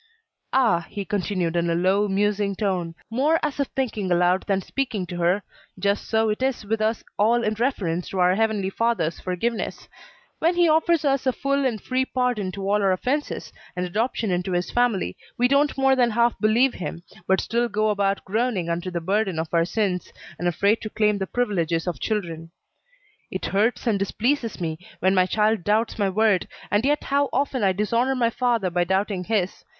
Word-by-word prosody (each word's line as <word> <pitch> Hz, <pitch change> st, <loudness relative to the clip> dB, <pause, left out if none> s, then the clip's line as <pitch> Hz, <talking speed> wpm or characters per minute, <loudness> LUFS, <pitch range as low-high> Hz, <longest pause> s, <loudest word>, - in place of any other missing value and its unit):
"Ah!" 225 Hz, -11 st, +2 dB
he 200 Hz, -1 st, -5 dB
continued 185 Hz, -4 st, -1 dB
in 170 Hz, 0 st, +1 dB
a 165 Hz, -, +1 dB
low, 190 Hz, +4 st, +2 dB
musing 200 Hz, 0 st, 0 dB
tone, 180 Hz, -5 st, -2 dB, 0.2 s
more 295 Hz, +8 st, +2 dB
as 295 Hz, -2 st, -2 dB
if 280 Hz, -, +1 dB
thinking 220 Hz, -8 st, -2 dB
aloud 180 Hz, +1 st, +3 dB
than 195 Hz, -2 st, +2 dB
speaking 225 Hz, -1 st, -3 dB
to 175 Hz, 0 st, -7 dB
her, 175 Hz, +4 st, +1 dB, 0.3 s
"just 200 Hz, 0 st, 0 dB
so 220 Hz, 0 st, +2 dB
it 210 Hz, +3 st, -2 dB
is 260 Hz, -4 st, -1 dB
with 220 Hz, +1 st, -1 dB
us 220 Hz, +1 st, 0 dB, 0.2 s
all 235 Hz, +3 st, +3 dB
in 215 Hz, -, +1 dB
reference 205 Hz, -8 st, -1 dB
to 195 Hz, -, -5 dB
our 180 Hz, 0 st, +4 dB
Heavenly 210 Hz, -2 st, 0 dB
Father's 230 Hz, -8 st, 0 dB
forgiveness; 215 Hz, +6 st, -3 dB, 0.5 s
when 335 Hz, +2 st, +2 dB
he 350 Hz, -1 st, +4 dB
offers 320 Hz, 0 st, +3 dB
us 275 Hz, -1 st, +1 dB
a -, -, +5 dB
full 275 Hz, +1 st, 0 dB
and 225 Hz, -4 st, -3 dB
free 255 Hz, +4 st, 0 dB
pardon 250 Hz, -6 st, -1 dB
of 195 Hz, -, -4 dB
all 205 Hz, +2 st, +1 dB
our 195 Hz, -1 st, +3 dB
offences, 260 Hz, +10 st, -2 dB, 0.2 s
and 180 Hz, 0 st, -1 dB
adoption 220 Hz, +2 st, -1 dB
into 180 Hz, +1 st, -1 dB
his 175 Hz, 0 st, -1 dB
family, 230 Hz, -, +1 dB, 0.2 s
we 245 Hz, -, +4 dB
don't 280 Hz, +2 st, +2 dB
more 270 Hz, 0 st, +4 dB
than 245 Hz, -2 st, +3 dB
half 235 Hz, +1 st, +2 dB
believe 235 Hz, +4 st, +3 dB
him, 170 Hz, -1 st, -6 dB, 0.2 s
but 190 Hz, 0 st, +3 dB
still 235 Hz, +1 st, 0 dB
go 215 Hz, 0 st, +1 dB
about 200 Hz, -1 st, 0 dB
groaning 210 Hz, -4 st, -1 dB
under 170 Hz, +2 st, -2 dB
the 175 Hz, -1 st, -3 dB
burden 195 Hz, 0 st, 0 dB
of 160 Hz, +1 st, -3 dB
our 165 Hz, 0 st, +3 dB
sins, 185 Hz, -2 st, -1 dB, 0.3 s
and 175 Hz, -, -1 dB
afraid 200 Hz, +6 st, +2 dB
to 215 Hz, -, -5 dB
claim 210 Hz, -1 st, +1 dB
the 190 Hz, -, -2 dB
privileges 170 Hz, -9 st, 0 dB
of 175 Hz, -2 st, -3 dB
children. 170 Hz, -7 st, -3 dB, 0.8 s
"It -, -, -4 dB
hurts 215 Hz, +5 st, +1 dB
and 215 Hz, -4 st, +1 dB
displeases 230 Hz, +4 st, -1 dB
me 160 Hz, -2 st, -3 dB, 0.2 s
when 190 Hz, +1 st, +3 dB
my 185 Hz, -1 st, +3 dB
child 215 Hz, -1 st, +1 dB
doubts 220 Hz, +3 st, 0 dB
my 200 Hz, -1 st, +2 dB
word, 205 Hz, -1 st, +2 dB, 0.2 s
and 205 Hz, +2 st, +2 dB
yet 290 Hz, +2 st, +1 dB
how 280 Hz, 0 st, +1 dB
often 270 Hz, -1 st, 0 dB
I 195 Hz, -2 st, +3 dB
dishonor 230 Hz, +7 st, +1 dB
my 235 Hz, -2 st, +1 dB
Father 230 Hz, -7 st, 0 dB
by 175 Hz, +1 st, +2 dB
doubting 190 Hz, +1 st, -1 dB
his. 200 Hz, -3 st, -1 dB
210 Hz, 195 wpm, -24 LUFS, 185-240 Hz, 0.8 s, a